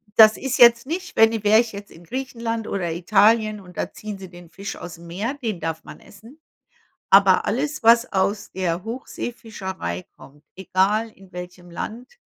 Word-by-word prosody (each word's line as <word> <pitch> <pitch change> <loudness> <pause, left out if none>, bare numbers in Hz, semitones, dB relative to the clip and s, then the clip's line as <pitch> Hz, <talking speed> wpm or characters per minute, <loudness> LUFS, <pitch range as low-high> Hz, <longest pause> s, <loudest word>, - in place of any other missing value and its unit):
Das 215 -1 +8
ist 265 -1 -2
jetzt 235 0 +7
nicht, 360 +3 -5
wenn 225 0 +6
i 220 -2 -3
wäre 215 +2 +6
ich 235 -3 -1
jetzt 200 0 -9
in 165 - -15
Griechenland 230 0 -4
oder 175 -4 -2
Italien 210 +5 +3
und 180 -2 -15
da - - -3
ziehen 210 -1 -7
sie 190 -1 -10
den 175 -1 -14
Fisch 195 +4 -7
ausm 170 -1 -10
Meer, 200 +10 -3
den 225 -10 -4
darf 160 0 -4
man - - -12
essen. 225 +9 -16 0.7
Aber 195 -1 +6
alles, 285 +5 -2
was 235 +1 +5
aus 200 +2 0
der 180 0 -2
Hochseefischerei 210 - -6
kommt, 145 +3 -17
egal 195 +4 +1
in 190 -3 -19
welchem 180 0 -9
Land, 245 - -7
205 Hz, 175 wpm, -22 LUFS, 180-230 Hz, 0.7 s, Das